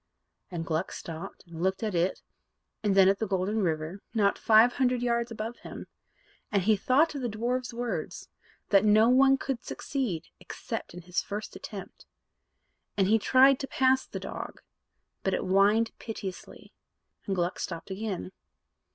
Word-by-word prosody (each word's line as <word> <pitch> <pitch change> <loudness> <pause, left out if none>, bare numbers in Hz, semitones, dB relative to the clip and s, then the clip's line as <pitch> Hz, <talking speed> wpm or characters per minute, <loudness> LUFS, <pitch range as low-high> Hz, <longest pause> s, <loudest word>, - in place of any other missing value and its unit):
And 170 -2 -4
Gluck 160 -1 -1
stopped 165 +3 -8
and 170 -1 -9
looked 190 +3 0
at 215 -2 -1
it 175 +2 0 0.6
and 205 -2 +1
then 190 -1 +7
at 195 0 +3
the 220 - -1
Golden 195 +3 0
River, 165 +2 -2
not 200 -2 +3
five 225 +2 +5
hundred 250 -2 +1
yards 235 -1 0
above 225 +1 -5
him; - - -9 0.7
and 200 -3 +2
he 215 +3 +4
thought 270 +10 +3
of 280 - -4
the 245 - -1
dwarf's 245 +3 -2
words, 240 0 -4 0.4
"that 200 -1 +5
no 215 +2 +5
one 270 +2 +5
could 265 -3 -4
succeed, 235 - -3
except - - -6
in 180 - -9
his 180 +1 -1
first 205 +1 -6
attempt"; 200 -3 -9 0.9
and 195 -1 +3
he 225 +1 +5
tried 260 +4 +5
to 270 - -4
pass 260 0 +2
the - - -6
dog, - - -7 0.6
but 190 -1 0
it - - -2
whined 205 +4 +3
piteously, 195 -5 -8 0.5
and 195 - 0
Gluck 175 0 -1
stopped 170 +2 -5
again. 195 -2 -4
210 Hz, 160 wpm, -28 LUFS, 190-240 Hz, 0.9 s, then